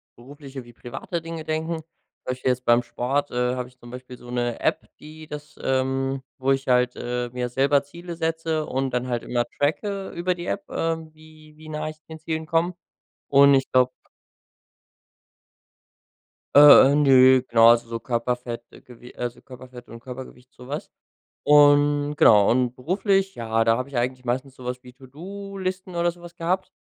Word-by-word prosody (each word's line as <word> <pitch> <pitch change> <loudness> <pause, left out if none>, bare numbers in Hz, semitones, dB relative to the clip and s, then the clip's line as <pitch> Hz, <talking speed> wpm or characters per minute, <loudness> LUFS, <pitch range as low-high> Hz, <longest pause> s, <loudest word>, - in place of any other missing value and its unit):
berufliche 135 +1 -11
wie 120 - -15
private 135 +9 -6
Dinge 165 -1 -7
denken. 160 +1 -2
Zum 160 0 -19
Beispiel 130 0 -2
jetzt 125 0 -4
beim 120 +1 +4
Sport, 125 +4 -2
äh, 125 0 0
habe 125 -1 -4
ich 125 - -26
zum 120 - -13
Beispiel 125 0 -10
so 120 - -14
'ne 120 -1 -2
App, - - -1
die 155 +1 -12
das 150 0 -9
ähm, 135 0 -1 0.2
wo 135 +1 +1
ich 135 0 -1
halt, 125 0 +2
äh, 120 0 -3
mir 125 0 -3
selber 140 +3 +2
Ziele 170 +4 -9
setze 160 -1 -2
und 135 0 -2
dann 125 0 -1
halt 120 -2 -2
immer 120 -1 -1
tracke 195 +7 -1
über 180 +1 -1
die 175 - -7
App, 200 - -4
äh, 165 0 -1 0.2
wie 155 -1 -18
wie 155 0 -12
nah 155 0 -4
ich 155 - -10
den 160 0 -9
Zielen 160 0 -4
komme. 165 +3 0 0.5
Und 140 0 +6
ich 135 0 0
glaube 130 0 +4 2.7
Äh, 145 -1 +9
äh, - - +2
nö, 130 -3 +6
genau, 115 0 +6
also, 115 0 +2
so 115 0 -4
Körperfett 120 0 -3 0.2
Gew 125 0 -14
also, 120 0 -5
Körperfett 125 -1 -13
und 115 - -10
Körpergewicht, 125 0 -11
so 125 +1 -14
was. 145 +2 -5 0.6
Und 145 0 +4
genau 105 -6 +6
und 125 0 +1
beruflich, 195 - 0
ja, 115 -1 0
da 115 0 +3
habe 130 - -4
ich 140 - -11
eigentlich 125 +1 -2
meistens 130 +2 -2
so 130 - -12
was 125 0 -5
wie 125 - -13
To-do-Listen 185 +7 -7
oder 170 0 +1
so 175 - -19
was 175 0 -12
gehabt. 185 +2 -2
135 Hz, 180 wpm, -24 LUFS, 125-160 Hz, 2.7 s, Äh